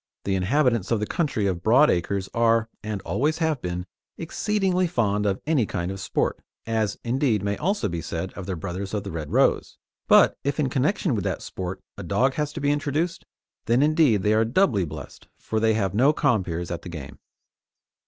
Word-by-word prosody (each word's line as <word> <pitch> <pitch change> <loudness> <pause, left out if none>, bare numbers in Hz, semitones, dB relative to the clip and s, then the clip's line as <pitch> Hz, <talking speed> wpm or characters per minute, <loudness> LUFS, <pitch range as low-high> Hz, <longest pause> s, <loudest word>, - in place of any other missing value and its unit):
The 100 - -1
inhabitants 115 +2 +1
of 115 - +1
the 105 - -1
country 140 - -1
of 90 -3 -1
broad 125 +9 +5
acres 95 +2 -1
are, 115 -1 +2
and 105 -3 -4
always 150 +9 0
have 160 -5 0
been, 90 0 -4 0.3
exceedingly 185 +1 0
fond 105 - 0
of 95 -1 0
any 145 -9 +2
kind 90 -2 -3
of 95 - -6
sport - - -1 0.3
as, 110 -3 -1
indeed, 120 -4 +1
may 100 0 0
also 185 - 0
be 85 -3 -3
said 85 +3 -4
of 95 -1 -8
their 95 - -2
brothers 95 +4 -5
of 100 - -2
the 100 - -6
Red 80 -3 -5
Rose - - +2 0.3
but - - +6
if 140 +2 -1
in 140 -3 +1
connection 150 +4 +1
with 105 -5 -1
that - - -2
sport 95 +1 -6 0.2
a - - -5
dog 130 +2 +1
has 150 0 -2
to 160 - -5
be 145 0 +1
introduced, 150 +4 -1 0.4
then 120 +4 +3
indeed 150 - +3
are 110 +1 +4
they 115 - -3
doubly 120 - +2
blessed, 75 - -10
for 110 - -2
they 110 0 +3
have 100 -3 0
no 130 +8 +4
compeers 90 - 0
at 85 - -4
the - - -9
game. 70 -5 -8
110 Hz, 200 wpm, -24 LUFS, 95-145 Hz, 0.4 s, but